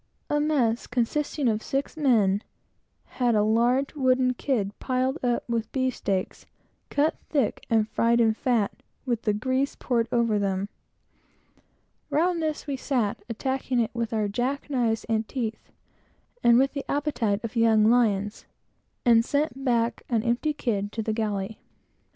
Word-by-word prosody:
A 295 - +2
mess, 265 -7 +1
consisting 260 +3 -1
of 220 -1 +1
six 275 +4 -3
men, 220 -10 +3 0.6
had 245 -3 0
a 210 - +3
large 240 +5 +2
wooden 255 -3 +2
kid 235 -6 -1
piled 260 +4 -1
up 240 -1 0
with 230 -2 -2
beefsteaks, 255 -8 -2 0.4
cut 300 +3 +1
thick, 275 -8 0
and 220 -2 +3
fried 230 +2 +2
in 225 -2 +4
fat, 225 -3 +1 0.3
with 240 -3 -1
the 210 - +1
grease 260 +5 0
poured 235 -3 0
over 230 -3 +2
them. 195 0 -1 1.4
Round 335 +4 +1
this 310 -1 -2
we 280 -2 -3
sat, 235 -4 -1
attacking 260 +2 -1
it 230 - 0
with 235 -2 -2
our 215 -2 0
jack 255 +8 -2
knives 235 -4 +1
and 220 -1 -1
teeth, 225 -5 -4 0.7
and 235 0 +6
with 270 +1 +3
the 280 -2 -6
appetite 250 -8 0
of 230 +1 -5
young 225 -2 +4
lions, 215 -4 +1 0.6
and 230 -1 +6
sent 285 +1 -1
back 235 -2 +1
an 225 -3 +1
empty 240 +6 +1
kid 205 -8 -2
to 225 - -2
the 220 - -1
galley. 210 -1 -2
235 Hz, 150 wpm, -26 LUFS, 220-265 Hz, 1.4 s, and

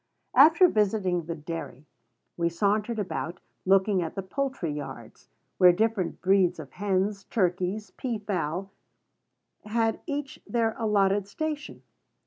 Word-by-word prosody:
After 320 +7 +7
visiting 195 - +1
the 165 0 -4
dairy, 150 -3 -7 0.5
we 170 -1 +1
sauntered 210 +6 0
about, 180 -4 -3 0.3
looking 195 0 +4
at 165 - -4
the 195 - -3
poultry 260 - -2
yards, 145 0 -9 0.3
where 180 -1 +8
different 210 -1 -1
breeds 190 -2 +3
of 140 -4 -9
hens, 195 0 -1
turkeys, 185 +1 -1
pea 245 -4 -3
fowl, 195 -2 -3 0.9
had 225 +1 0
each 285 -2 -4
their 230 -2 +1
allotted 200 -3 +2
station. 305 +6 -5
200 Hz, 120 wpm, -27 LUFS, 180-225 Hz, 0.9 s, where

